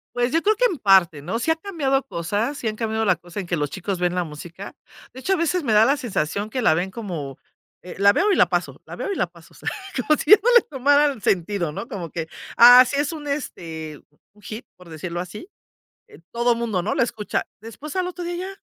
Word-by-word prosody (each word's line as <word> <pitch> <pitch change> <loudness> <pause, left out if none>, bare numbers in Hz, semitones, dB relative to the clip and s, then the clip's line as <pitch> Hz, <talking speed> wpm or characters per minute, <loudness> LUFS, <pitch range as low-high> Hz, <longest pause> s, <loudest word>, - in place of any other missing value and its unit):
Pues, 245 0 0
yo 330 +3 +1
creo 430 +1 +3
que - - +2
en 350 - -4
parte, 185 - +4
¿no? 190 +9 -3
Sí 245 - -2
ha 320 - +4
cambiado 305 -7 -1
cosas, 210 - -2
sí 230 - -3
han 215 - -2
cambiado 220 0 -2
la 185 -4 +3
cosa 175 +3 -9
en 190 - -5
que 175 - 0
los 145 -1 -2
chicos 190 +1 -4
ven 180 0 0
la 180 0 0
música. 170 +5 -9 0.4
De 260 - -11
hecho, 385 - +1
a - - +3
veces, 335 +1 0
me 230 -5 0
da 215 +1 +6
la 275 +4 +2
sensación 205 - -3
que 255 - -2
la 160 - +4
ven 180 +3 -2
como: 170 - -6 0.4
"Eh, 180 - -10
la 200 +1 +5
veo 415 - +2
y - - +3
la - - +5
paso, - - -2
la - - -9
veo - - -4
y - - -2
la - - +1
paso". - - -19
O - - -17
sea, - - -3 0.3
como 255 +5 +2
si - - -5
ya 420 - +11
no 480 - +4
le 480 - +9
tomara 285 +1 +2
el 265 - -9
sentido, 180 -2 0
¿no? 190 - -6
Como 185 - -6
que, 165 -2 -4 0.3
ah, 245 +2 +10
sí 280 +3 -3
es 290 +1 0
un, 310 -3 -8
este, 160 - -5 0.3
un 210 - -23
hit, 225 +3 -8
por 180 - -17
decirlo 170 +2 -5
así, 180 - -8 0.6
eh, - - -16
todo 240 +1 +2
el 230 - -2
mundo, 225 -6 -1
¿no?, 205 - -1
lo - - +2
escucha. 220 -3 -2
Después, 230 +7 -9
al 370 -1 0
otro 360 -1 -7
día, 345 0 -4
ya 380 +2 -5
220 Hz, 260 wpm, -22 LUFS, 180-285 Hz, 0.6 s, ya